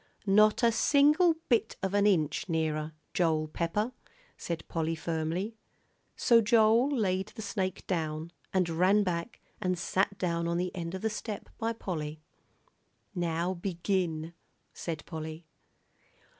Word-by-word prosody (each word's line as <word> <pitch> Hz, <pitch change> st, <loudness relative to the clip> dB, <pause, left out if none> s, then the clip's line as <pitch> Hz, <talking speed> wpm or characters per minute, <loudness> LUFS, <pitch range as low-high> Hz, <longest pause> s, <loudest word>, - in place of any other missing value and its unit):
"Not 215 Hz, +4 st, +5 dB
a 235 Hz, -, +6 dB
single 300 Hz, +8 st, +4 dB
bit 230 Hz, -3 st, +2 dB
of 190 Hz, 0 st, -1 dB
an 205 Hz, 0 st, +4 dB
inch 160 Hz, -3 st, +1 dB
nearer, 160 Hz, -1 st, -1 dB, 0.2 s
Joel 160 Hz, -3 st, +2 dB
Pepper," 170 Hz, +9 st, -1 dB, 0.4 s
said 170 Hz, -2 st, -5 dB
Polly, 165 Hz, 0 st, -1 dB
firmly. 165 Hz, +7 st, -2 dB, 0.6 s
So 230 Hz, -1 st, +5 dB
Joel 225 Hz, +3 st, +4 dB
laid 195 Hz, -8 st, 0 dB
the 220 Hz, 0 st, -8 dB
snake 195 Hz, -2 st, -3 dB
down 160 Hz, -2 st, -2 dB, 0.2 s
and 185 Hz, -2 st, +2 dB
ran 185 Hz, +5 st, +3 dB
back 180 Hz, +3 st, -3 dB, 0.2 s
and 185 Hz, -2 st, 0 dB
sat 190 Hz, +3 st, 0 dB
down 170 Hz, -2 st, -1 dB
on 170 Hz, 0 st, 0 dB
the 180 Hz, +2 st, -2 dB
end 170 Hz, 0 st, -4 dB
of 190 Hz, -, -6 dB
the 220 Hz, -, +1 dB
step 215 Hz, -1 st, -5 dB
by 230 Hz, 0 st, 0 dB
Polly. 155 Hz, -8 st, -4 dB, 0.9 s
"Now 175 Hz, 0 st, -1 dB
begin," 170 Hz, -3 st, -2 dB, 0.4 s
said 160 Hz, -3 st, -5 dB
Polly. 160 Hz, 0 st, -6 dB
180 Hz, 135 wpm, -30 LUFS, 165-210 Hz, 0.9 s, a